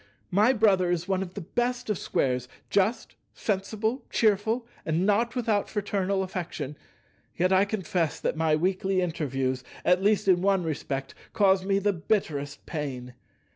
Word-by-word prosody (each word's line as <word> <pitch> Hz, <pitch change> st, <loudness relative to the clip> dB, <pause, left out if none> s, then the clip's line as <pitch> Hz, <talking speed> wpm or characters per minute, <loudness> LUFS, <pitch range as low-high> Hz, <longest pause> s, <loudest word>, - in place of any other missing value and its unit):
My 210 Hz, +7 st, +5 dB
brother 200 Hz, -7 st, +3 dB
is 175 Hz, 0 st, -1 dB
one 190 Hz, -1 st, 0 dB
of 185 Hz, -1 st, -6 dB
the 205 Hz, -, -4 dB
best 245 Hz, +7 st, -2 dB
of 210 Hz, -, 0 dB
Squares, 125 Hz, -2 st, 0 dB, 0.2 s
just, 205 Hz, +4 st, +1 dB, 0.2 s
sensible, 220 Hz, +4 st, -1 dB
cheerful, 220 Hz, +2 st, +2 dB, 0.2 s
and 165 Hz, +3 st, 0 dB
not 225 Hz, +4 st, +2 dB
without 220 Hz, -5 st, 0 dB
fraternal 200 Hz, -2 st, -1 dB
affection; 170 Hz, -6 st, -5 dB, 0.6 s
yet 185 Hz, +2 st, +3 dB
I 190 Hz, +1 st, +5 dB
confess 185 Hz, -6 st, -1 dB
that -, -, -1 dB
my 160 Hz, -1 st, +2 dB
weekly 185 Hz, +3 st, 0 dB
interviews, 135 Hz, -7 st, -1 dB, 0.2 s
at 180 Hz, +1 st, +4 dB
least 205 Hz, 0 st, +2 dB
in 180 Hz, -2 st, +5 dB
one 195 Hz, -1 st, +2 dB
respect, 140 Hz, -4 st, -3 dB, 0.2 s
cause 190 Hz, -2 st, +4 dB
me 195 Hz, 0 st, +1 dB
the 200 Hz, +1 st, +1 dB
bitterest 150 Hz, -6 st, -2 dB
pain. 130 Hz, -5 st, -5 dB
190 Hz, 150 wpm, -27 LUFS, 160-205 Hz, 0.6 s, My